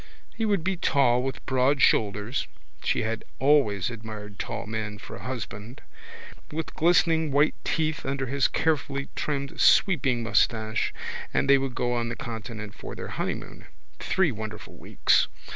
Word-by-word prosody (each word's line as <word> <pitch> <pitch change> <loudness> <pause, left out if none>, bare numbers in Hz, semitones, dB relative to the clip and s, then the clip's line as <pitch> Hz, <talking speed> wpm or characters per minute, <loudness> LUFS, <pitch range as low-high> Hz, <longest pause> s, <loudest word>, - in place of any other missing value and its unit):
He 225 - -2
would 200 -6 +1
be 190 +1 0
tall 130 -7 +3
with 135 +1 -4
broad 130 +2 +2
shoulders 105 +2 +2 0.4
(she - - +1
had 115 0 -2
always 130 -7 +3
admired 105 -3 -8
tall - - -4
men 110 -1 -4
for - - -9
a - - -11
husband) 120 -2 -6 0.7
with 160 +1 -4
glistening 165 -1 +3
white 145 +3 +4
teeth 155 -1 -1
under 135 0 -2
his 135 +1 +2
carefully 140 -3 -1
trimmed 140 -2 -2
sweeping 135 - +4
moustache 110 -1 +1 0.4
and - - +1
they 140 0 +6
would 135 -2 -3
go 125 0 0
on 120 -1 -1
the 115 - -3
continent 110 -4 -6
for - - -8
their - - -6
honeymoon - - -4 0.3
(three 190 -5 +2
wonderful 110 -1 -7
weeks!) - - +2
130 Hz, 150 wpm, -26 LUFS, 110-145 Hz, 0.7 s, they